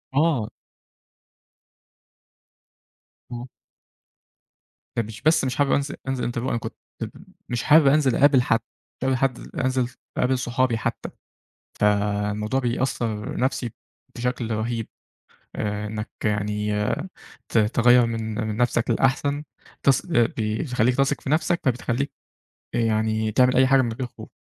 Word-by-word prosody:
آه. 145 -7 +2 2.8
أه. 120 +1 -6 1.5
يعني 115 -2 0
مش 110 +1 -10
بس 155 0 +3
مش 130 -1 -1
حابب 145 0 +2
أنز 140 0 +1
أنزل 130 -2 -1
INTERVIEW، 120 - -7
أنا - - 0
كنت 115 - -6 0.8
مش 120 -1 -1
حابب 150 -1 +6
أنزل 135 -3 +4
اقابل 140 -2 +5
حد، 115 -2 +2 0.4
تقابل 130 0 +1
حد 130 -1 0
ل - - -10
أنزل 130 -1 +1 0.3
اقابل 130 +1 +2
صحابي 125 -1 0
حتّى. 110 - -3 0.7
فالموضوع 105 +3 +1
بيأثّر 120 -3 -2
نفسي 125 -2 -1 0.4
بشكل 125 -1 -2
رهيب. 115 +1 -2 0.7
آآ 105 0 -2
إنك 105 +1 -5 0.2
يعني 105 0 0 0.7
ت - - +2
تغيّر 120 +3 +5
من، 115 -1 -3
من 105 - -3
نفسك 120 0 +1
للأحسن 140 +2 +1 0.4
تث 135 -2 +3
آآ 120 -1 +6
بيخلّيك 115 +2 0
تثق 140 +1 +1
في - - -5
نفسك، 170 +3 +2
فبتخلّيك 125 +1 0 0.6
يعني 110 -1 +1
تعمل 125 +3 +4
أي 130 +1 +5
حاجة 135 0 +5
من 120 -3 -1
غير 125 +2 -4
خوف. - - -12
120 Hz, 130 wpm, -24 LUFS, 110-130 Hz, 2.8 s, حابب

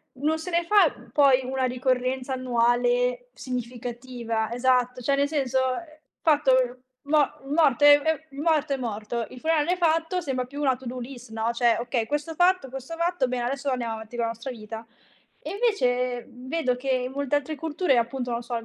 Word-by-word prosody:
non 300 +4 0
se 340 +3 -6
ne 340 0 +2
fa 410 +4 +4 0.2
poi 275 -3 +5
una 260 +1 -2
ricorrenza 255 +1 0
annuale 245 0 +1
significativa, 240 -2 -4
esatto, 250 0 +1
cioè, 275 +3 +2
nel 280 0 +2
senso, 270 -4 0 0.6
fatto 295 -4 +3 0.5
mo 295 -1 +3
morto 295 0 +3
è 290 0 +9
è 315 -1 +1 0.2
morto 305 -1 +1
è - - -1
morto, 230 -1 -3
il 255 - -10
funerale 320 +3 +1
fatto 330 +1 +1
sembra 260 -5 -2
più 280 +3 -9
una 265 -3 +3
to 260 +1 -14
do 250 +1 -5
list 245 -1 -9
no, 225 +1 -1
cioè: 235 -1 +2
"Okay 240 -1 -1
questo 295 +5 -3
fatto 355 -5 +3
questo 270 +5 -7
fatto, 335 -5 0
bene, 250 -1 -2
adesso 275 +2 -2
andiamo 240 -3 -2
avanti 220 +2 -8
con 235 - 0
la 230 - -1
nostra 230 +3 -6
vita." 225 0 -8 0.6
E - - -7
invece 250 - 0
vedo 255 +2 -2
che 260 +2 -7
in 255 0 0
molte 280 +1 0
altre 310 +2 -2
culture, 320 -1 0
appunto, 245 +1 -1
non 235 0 -2
so, 240 0 -4
il 230 - -5
255 Hz, 185 wpm, -26 LUFS, 245-290 Hz, 0.6 s, è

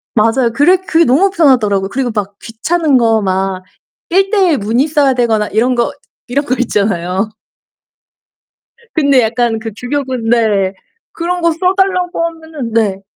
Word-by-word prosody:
맞아요. 230 +2 +2
그래 300 +9 +4
그게 335 -2 +1
너무 315 +11 +3
편하더라고요. 220 - +2
그리고 255 0 -2
막 200 -2 -4
귀찮은 290 +6 0
거 225 -2 +2
막 190 -1 -2 0.5
1 390 +3 +2
대 390 -4 +3
1 290 - +2
문의 230 +8 0
써야 290 -3 +2
되거나 225 -4 0
이런 245 +5 +1
거 240 - 0 0.4
이런 280 +4 -1
거 255 - 0
있잖아요. 200 -3 -1 1.7
근데 280 -5 +3
약간 225 0 0
그 225 0 -6
규격은 255 -3 -3
네. 210 -5 +2 0.4
그런 355 +1 -3
거 335 0 +2
써달라고 365 0 0
하면은 320 -8 -7
네. 200 -4 0
245 Hz, 285 characters per minute, -14 LUFS, 220-320 Hz, 1.7 s, 그래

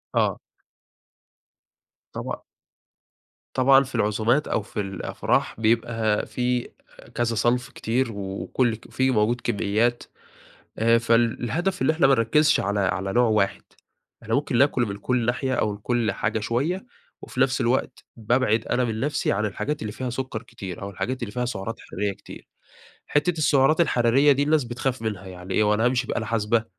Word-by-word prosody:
آه. - - +1 1.7
طبعًا. - - -5 1.1
طبعًا 135 +1 +5
في 135 -1 -9
العزومات 110 +6 +1
أو - - 0
في 105 - -7
الأفراح، 95 +2 -2
بيبقى 115 -1 +1
فيه 125 -1 -1 0.5
كذا 115 -1 0
صنف 120 +3 +1
كتير 125 0 -1
وكل 100 +4 -1
فيه 130 0 +1
موجود 120 +1 +1
كميّات. 115 +2 0 0.7
آآ، 115 +1 +4
فالهدف 120 +10 +1
اللي - - +3
إحنا 160 -3 +4
ما 135 - +5
نركزش 150 +6 +3
على 100 +1 -1
على 95 0 -1
نوع 120 0 +4
واحد، 105 -2 +1 0.6
إحنا - - -3
ممكن - - 0
ناكل 135 -1 +3
من 100 -2 -5
كل 120 +3 0
ناحية 125 +2 0
أو 105 -4 +1
من 100 - -6
كل 115 0 0
حاجة 105 +3 -1
شوية، 140 - -1 0.4
وفي - - -8
نفس 130 -1 +2
الوقت 125 +1 -1
بابعد 115 -1 +1
أنا 125 +1 +1
من 110 -2 -2
نفسي 145 +3 0
عن 105 +2 0
الحاجات 145 +9 -3
اللي 110 - -4
فيها 130 +2 -4
سكر 125 -2 -4
كتير 95 -6 -8
أو 100 - -5
الحاجات 130 +7 -4
اللي 105 - -5
فيها 125 +3 -2
سعرات 115 -1 -4
حرارية 100 +1 -3
كتير. - - -13 0.6
حتة 150 +5 +2
السعرات 150 +1 +4
الحرارية 135 -1 +4
دي 140 +1 +3
الناس 150 0 +2
بتخاف 120 +1 -3
منها، 105 -4 -4
يعني 90 0 -7
إيه؟ 110 - +3
هو 105 0 +3
أنا 110 +2 +1
هامشي 125 0 +1
بآلة 110 - -2
حاسبة، 115 0 +1
120 Hz, 160 wpm, -24 LUFS, 105-130 Hz, 1.7 s, طبعًا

